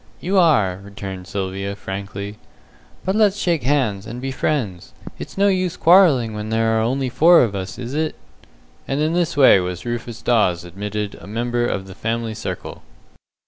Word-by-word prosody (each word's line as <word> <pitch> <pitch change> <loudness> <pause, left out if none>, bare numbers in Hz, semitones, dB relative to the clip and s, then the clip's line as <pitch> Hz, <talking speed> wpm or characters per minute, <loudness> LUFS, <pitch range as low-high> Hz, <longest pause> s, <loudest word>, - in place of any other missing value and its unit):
"You 190 +2 +1
are," 110 - +3
returned 95 -2 -8
Sylvia, 100 0 -3
frankly, 100 +1 -6 0.7
"but 190 +2 0
let's 210 -2 +3
shake 170 -6 0
hands, 120 -7 0
and 120 +2 -6
be 135 +1 -4
friends. 120 - -2 0.3
It's - - -8
no 200 +1 +4
use 185 -2 0
quarrelling 160 - +5
when 105 0 -5
there 115 0 +1
are 110 - +2
only 130 +4 0
four 165 +6 +6
of 110 -4 -1
us, 95 0 -5
is 125 +1 -6
it?" 155 +1 -1 0.7
And 135 - -1
in 155 +2 +1
this 175 -3 0
way 130 -8 +7
was 90 0 -4
Rufus 120 -1 -5
Dawes 100 -8 +2
admitted 105 +3 -5
a - - -11
member 120 +3 -1
of 95 -4 -3
the 95 - -10
family 115 +2 -3
circle. - - -6
115 Hz, 175 wpm, -21 LUFS, 100-145 Hz, 0.7 s, way